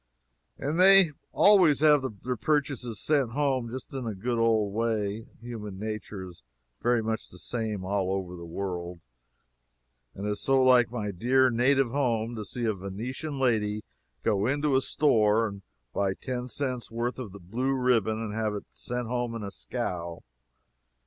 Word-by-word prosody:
And 150 +5 -2
they 190 -2 +8 0.2
always 180 -9 +5
have 150 -3 +5 0.2
their 125 0 -1
purchases 130 -3 -1
sent 140 -7 +1
home 135 -4 0
just 130 +3 -7
in 130 -2 -4
the 110 -3 -3
good 120 +4 -1
old 110 -3 +2
way. 110 -1 -1
Human 110 -5 -7
nature 105 -2 -5
is 90 -1 -14 0.4
very 120 -1 +2
much 110 0 -3
the - - -11
same 110 -5 -3
all 95 -1 0
over 95 -2 -3
the 85 - -9
world; 90 -1 -4 1.2
and 100 - -5
it 105 - 0
is 105 - -4
so 135 0 +3
like 125 -2 +5
my 105 -4 -3
dear 125 +7 +3
native 125 +1 +3
home 120 -4 0
to 110 - -4
see 120 +4 -4
a 110 - +2
Venetian 115 - -5
lady 105 -5 +1 0.4
go 100 +1 +2
into 145 +1 +1
a 130 - +4
store 115 -7 +3
and 100 -1 -8 0.3
buy 95 -1 0
ten 125 -1 -4
cents' 130 -1 -3
worth 120 +3 -3
of 100 -6 -9
blue 130 +4 0
ribbon 115 -4 +2
and 105 -2 -4
have 110 -1 -1
it 100 - -6
sent 125 -1 -4
home 120 -1 -2
in 115 - -5
a 100 - -5
scow. 85 +7 -4
115 Hz, 170 wpm, -28 LUFS, 105-130 Hz, 1.2 s, they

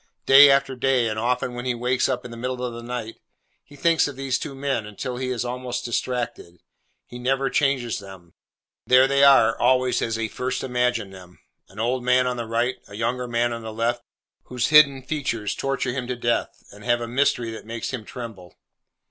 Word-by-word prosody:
Day 140 +1 +9
after 135 -1 +2
day, 125 -2 +2
and 110 0 -3
often 125 +1 -1
when 120 +1 -6
he 125 -1 0
wakes 125 +2 0
up 125 -2 -2
in 125 - -8
the - - -8
middle 125 +1 -3
of 120 - -4
the 120 - -8
night, 120 -2 -6 0.5
he 145 - -17
thinks 165 +2 +2
of 145 - -7
these 135 -1 -1
two 140 - -6
men 135 -5 -2
until 125 +4 -5
he 130 0 -3
is 125 -1 -2
almost 125 0 -4
distracted. 120 -7 -3 0.5
He 120 - -10
never 135 +2 0
changes 135 -6 0
them. 95 -4 -13 0.5
There 130 +1 +6
they 140 +1 +3
are 130 -5 +6
always 125 +1 +2
as 115 - -1
he 115 0 -2
first 125 +4 -3
imagined 125 -5 -1
them—an 90 +1 -16
old 120 +2 -1
man 125 +1 +3
on 125 -1 -2
the 120 -1 -4
right; 120 +3 0
a 100 - -11
younger 125 +3 -2
man 120 0 0
upon 115 0 -5
the 110 0 -7
left—whose 120 +1 -4
hidden 140 -3 +6
features 125 -8 -2
torture 135 -2 -2
him 125 -1 -4
to 125 - -2
death, 120 -1 -2
and 105 +1 -14
have 120 0 +1
a 120 - -4
mystery 120 -2 0
that 110 -1 -9
makes 115 0 -4
him 130 -5 -5
tremble. 110 -6 -9
125 Hz, 200 wpm, -23 LUFS, 115-130 Hz, 0.5 s, Day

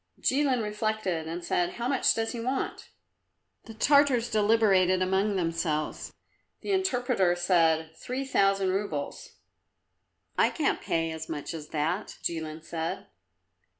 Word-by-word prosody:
Jilin 265 -4 +2
reflected 210 -6 -2
and 170 +2 -5
said, 175 0 0
"How 240 +1 -3
much 270 -1 +2
does 225 0 -1
he 240 - -5
want?" 255 +3 -3 0.8
The 225 - -10
Tartars 265 -1 +3
deliberated 205 -4 +3
among 190 +3 +1
themselves; 165 -3 -2 0.5
the - - -3
interpreter 250 - +1
said, 165 -3 +2
"Three 255 +10 -4
thousand 195 -6 +2
roubles." 185 -7 -4 1.1
"I - - +5
can't - - -1
pay 165 0 -1
as 160 0 -7
much 150 +1 -4
as 155 -2 -7
that," 160 +7 -2
Jilin 160 -1 -4
said. 165 0 -4
190 Hz, 125 wpm, -28 LUFS, 165-230 Hz, 1.1 s, I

